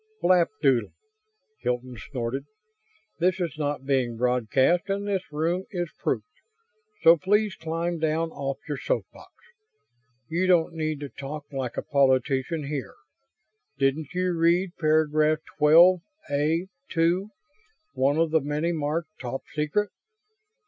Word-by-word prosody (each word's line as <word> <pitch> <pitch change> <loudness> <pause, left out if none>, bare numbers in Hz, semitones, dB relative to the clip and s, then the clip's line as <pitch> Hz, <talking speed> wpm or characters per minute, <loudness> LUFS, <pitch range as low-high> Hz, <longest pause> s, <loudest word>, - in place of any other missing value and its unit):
"Flapdoodle!" 170 - +3 0.7
Hilton 125 0 -2
snorted. 125 +4 -4 0.7
"This 180 +2 +2
is 175 -3 -2
not 145 -2 -2
being 130 -4 0
broadcast 125 - +2
and 200 +1 -1
this 190 -5 -2
room 170 +5 -1
is 175 -4 -3
proofed, - - -1 0.8
so 165 +1 +8
please 205 +4 +2
climb 165 +1 -3
down 160 +1 0
off 135 -2 -3
your 145 - -3
soapbox. - - -4 1.0
You 175 +3 0
don't 175 -2 +3
need 155 -2 -2
to 145 - -5
talk 145 +2 -7
like 130 -3 -4
a - - -1
politician 135 +3 +1
here. 140 -3 -5 0.8
Didn't 140 +3 0
you 180 -1 0
read 170 +3 +2
paragraph 155 -1 +3 0.2
12 170 +5 +7 0.3
A 155 +5 +1 0.2
2, 170 +5 +1 0.6
one 140 +3 +2
of 165 -1 +2
the 160 -1 +3
many 150 +4 -1
marked 155 0 -3
'Top 130 +1 -5
Secret'?" 155 +8 0
155 Hz, 125 wpm, -26 LUFS, 140-175 Hz, 1.0 s, so